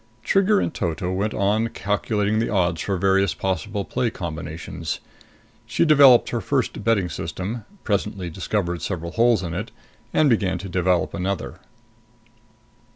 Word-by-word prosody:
Trigger 195 - +3
in - - -1
toto 90 - -2
went 100 +3 -1
on 105 +3 +2
calculating 105 0 -1
the 115 - 0
odds 90 -6 +1
for 95 0 -1
various 95 0 +2
possible 100 +2 -2
play 125 - -1
combinations. 85 -2 -5 0.7
She - - +2
developed 140 -6 +7
her 120 - -1
first 130 -6 -1
betting 105 -4 +2
system, 100 +6 -5 0.2
presently 100 -3 -2
discovered 90 -1 -2
several 85 -3 -4
holes 115 -1 +3
in 85 -2 -4
it, 100 +6 -4 0.4
and 155 - +3
began 100 -7 +2
to 95 +3 -7
develop 90 -1 +1
another. 95 +1 -3
100 Hz, 140 wpm, -23 LUFS, 90-115 Hz, 0.7 s, developed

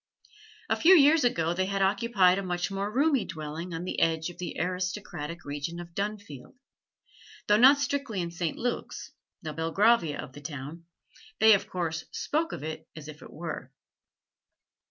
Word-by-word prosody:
A - - +2
few 360 +4 +7
years 300 -1 +6
ago 170 -9 +1
they 185 +1 -1
had 195 0 0
occupied 195 -2 +3
a - - -4
much 175 +1 -2
more 195 +1 -2
roomy 275 +1 +2
dwelling 155 +3 -6
on 165 +1 -4
the 185 - -3
edge 160 +1 +1
of - - -18
the 180 - -5
aristocratic 180 -2 -4
region 145 +4 -4
of 170 -1 -9
Dunfield; 200 - -5 0.9
though 210 - +4
not 265 +5 +8
strictly 280 -7 -2
in 170 -1 -3
St. 170 -2 -3
Luke's 245 0 -4 0.3
the 155 - -5
Belgravia 165 +1 +2
of 130 - -7
the 145 - -11
town 145 +3 -7 0.5
they 220 0 +8
of 200 +1 0
course 165 -3 -3
spoke 325 +3 -2
of - - -6
it 155 0 -6
as 155 -1 -9
if 155 -1 -10
it - - -12
were. 160 -5 -6
180 Hz, 170 wpm, -28 LUFS, 160-210 Hz, 0.9 s, not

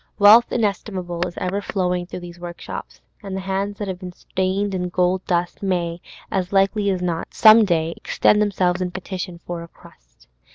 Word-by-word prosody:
Wealth 220 +4 +7
inestimable 195 -5 -2
is 175 - -10
ever 185 +2 -2
flowing 180 -3 -1
through 180 - -7
these 175 0 -10
workshops, 175 0 -8 0.2
and 195 -2 -6
the - - -3
hands 195 +2 -2
that 205 - -4
have 185 -1 -4
been 180 -2 -8
stained 190 +3 -2
with 180 -1 -2
gold 180 +1 +1
dust 175 -1 -1
may, 175 -3 -1 0.3
as 185 -2 -1
likely 200 +1 +2
as 185 -2 -1
not, 170 -2 -2
some 220 0 +8
day 165 -3 0
extend 210 - +2
themselves 185 -3 +1
in 180 - -1
petition 180 -1 -6
for 175 -1 -5
a 170 - -9
crust. - - -21
185 Hz, 180 wpm, -22 LUFS, 175-200 Hz, 0.3 s, some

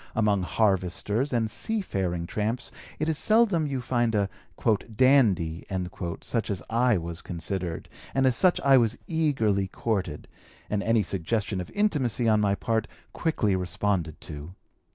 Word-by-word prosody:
Among 105 -3 +2
harvesters 100 - 0
and 115 -3 +1
seafaring 95 - -2
tramps 110 +6 -2 0.3
it 155 - -1
is 160 -2 0
seldom 215 -8 +3
you 135 -3 -2
find 120 -2 0
a 100 -1 +1 0.7
'dandy' 105 - +3 0.6
such 115 -2 -2
as 100 -3 -2
I 120 -1 +3
was 85 0 -4
considered, 85 0 -4 0.3
and 135 0 +3
as 130 -2 +4
such 185 +4 +4
I 135 -1 +6
was 115 -2 +2
eagerly 125 - +1
courted, 95 -8 -3 0.4
and 105 -1 +1
any 115 0 +2
suggestion 100 +2 -2
of 90 - -8
intimacy 135 - +1
on 110 -1 +4
my 100 -1 +2
part 110 +1 -1 0.3
quickly 110 - +1
responded 90 -3 -1
to. 75 +4 -8
110 Hz, 140 wpm, -27 LUFS, 95-130 Hz, 0.7 s, I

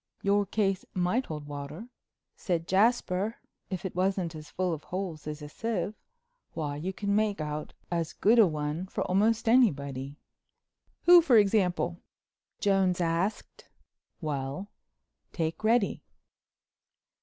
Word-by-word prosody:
"Your 200 0 +2
case 195 -2 0
might 185 +8 +1
hold 150 -2 -6
water," 145 +10 -7 0.5
said 170 -4 -2
Jasper, 205 0 +2 0.3
"if 185 0 -4
it 185 - -4
wasn't 185 -2 0
as 155 -2 -9
full 180 +3 -1
of 155 - -7
holes 180 -5 -5
as 150 0 -5
a - - -6
sieve. 215 +5 -3 0.6
Why, 150 -3 -2
you 175 +6 -3
can 200 +1 -1
make 210 -2 +1
out 150 0 -4 0.2
as 165 -2 -1
good 230 +3 +4
a 215 - +8
one 155 +3 -3
for - - -2
almost 215 +5 +2
anybody." 140 - +2 0.9
"Who, 350 0 +9
for 265 -8 +5
example?" 185 -4 +2 0.6
Jones 190 -3 +2
asked. 170 +4 -2 0.5
"Well—take 155 +3 -6
Reddy." 225 -1 +2
185 Hz, 125 wpm, -29 LUFS, 155-205 Hz, 0.9 s, Who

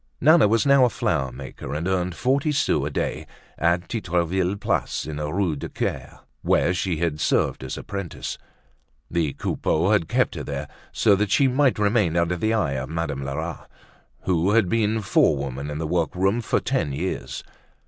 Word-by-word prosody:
Nana 155 -3 +6
was 110 +1 +2
now 140 -1 +6
a 125 - +5
flower 65 - -1
maker 65 +1 -7
and 80 +4 -2
earned 90 -2 0
forty 140 +4 +1
sous 75 - +1
a - - -2
day - - -3 0.3
at 85 +2 +1
Titreville's 90 -2 -1
place - - -1
in 75 -1 -5
the 75 0 -3
Rue 90 -3 0
du 70 - -6
Caire, - - -4 0.2
where 90 - +2
she 90 -2 -1
had 80 -2 -1
served - - +1
as 65 - -5
apprentice. 100 -4 -5 0.7
The 80 -5 0
Coupeaus 85 +6 0
had 85 -6 +2
kept - - +2
her - - -5
there - - -4 0.2
so 105 - +4
that 105 0 0
she 135 +7 +4
might 130 0 +2
remain 100 -5 +2
under 85 +1 +1
the 110 +5 0
eye 110 -10 +1
of 65 -1 -3
Madame 80 -4 -3
Lerat, 70 +1 -5 0.5
who 90 +2 +1
had 110 -5 +3
been 110 0 +1
forewoman 70 -7 +1
in 75 - -4
the 80 - -3
workroom 90 +6 0
for - - +1
ten 70 - -1
years. 90 +7 -4
90 Hz, 180 wpm, -24 LUFS, 75-105 Hz, 0.7 s, Nana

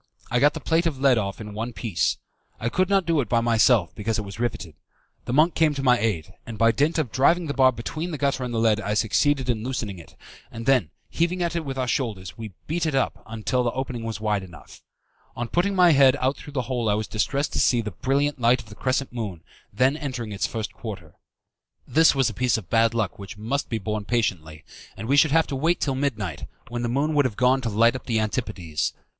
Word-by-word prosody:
I 125 - +2
got 145 +3 +4
the - - -4
plate 165 +1 +1
of 145 -5 -3
lead 135 -4 +4
off 100 -2 -4
in 105 -1 -8
one 115 +3 -4
piece. 105 -9 -1 0.4
I 115 - -1
could 185 +8 +1
not 195 -2 +3
do 165 -3 +2
it 120 - -5
by 120 - +3
myself, 115 -4 +3
because 110 +2 -2
it 110 - -2
was 100 +1 -9
riveted. 100 -9 -3 0.5
The - - -4
monk 155 +6 +4
came 155 -2 +2
to 135 - -3
my 125 -2 +4
aid, 100 -8 -2
and 115 -2 -8
by 115 +2 +4
dint 150 +7 +1
of 145 -8 -1
driving 165 +6 +3
the 140 - -3
bar 130 -2 +5
between 155 +8 -5
the 155 - -4
gutter 140 -2 0
and 125 - -4
the 115 - -2
lead 110 -2 +2
I 105 0 -2
succeeded 135 +5 +1
in 115 -3 -1
loosening 110 -7 -4
it, 85 - -15 0.4
and 115 0 -7
then, 130 - +3 0.2
heaving 175 +2 0
at 170 0 -2
it 170 - -1
with 135 -2 -5
our 130 -1 -1
shoulders, 110 -9 -2
we 110 -3 -8
beat 165 +1 -1
it 150 - -1
up 135 - -1 0.2
till 125 -1 +2
the 120 - +1
opening 130 -3 -4
was 115 -2 -4
wide 105 -2 0
enough. 90 -4 -13 0.5
On 120 - -3
putting 190 +8 0
my 180 -2 +6
head 135 -3 +6
out 130 +2 +1
through 145 - -11
the 130 -3 -1
hole 120 -2 -1
I 105 - +3
was 110 +1 -2
distressed 140 +6 -1
to - - 0
see 120 - +3
the 105 -1 -5
brilliant 140 +3 -1
light 120 +2 +4
of 110 - -18
the - - -10
crescent 130 +1 -1
moon 100 -9 -5 0.3
then 130 +7 +2
entering 130 -7 -5
in - - -5
its 100 - 0
first 110 -2 -5
quarter. 95 -9 -8 0.7
This 160 -1 +4
was 135 -3 +3
a 115 - -2
piece 125 +2 +1
of 100 -5 -9
bad 115 0 +3
luck 110 -5 -1
which 100 +1 -9
must 120 +7 -2
be 115 - -1
borne 105 0 -3
patiently, 85 -10 -2 0.3
and 110 - -6
we 140 - +3
should 145 +2 +5
have 160 +3 +3
to 140 - -5
wait 165 +6 +1
till 135 - 0
midnight, 110 - -3 0.2
when 120 0 -4
the 120 - -1
moon 140 +5 0
would 145 -2 +3
have 115 -5 -2
gone 130 +2 +3
to 120 - -2
light 115 +3 +3
up 130 - -8
the 115 -3 +1
Antipodes. 95 - -2
120 Hz, 245 wpm, -24 LUFS, 110-140 Hz, 0.7 s, my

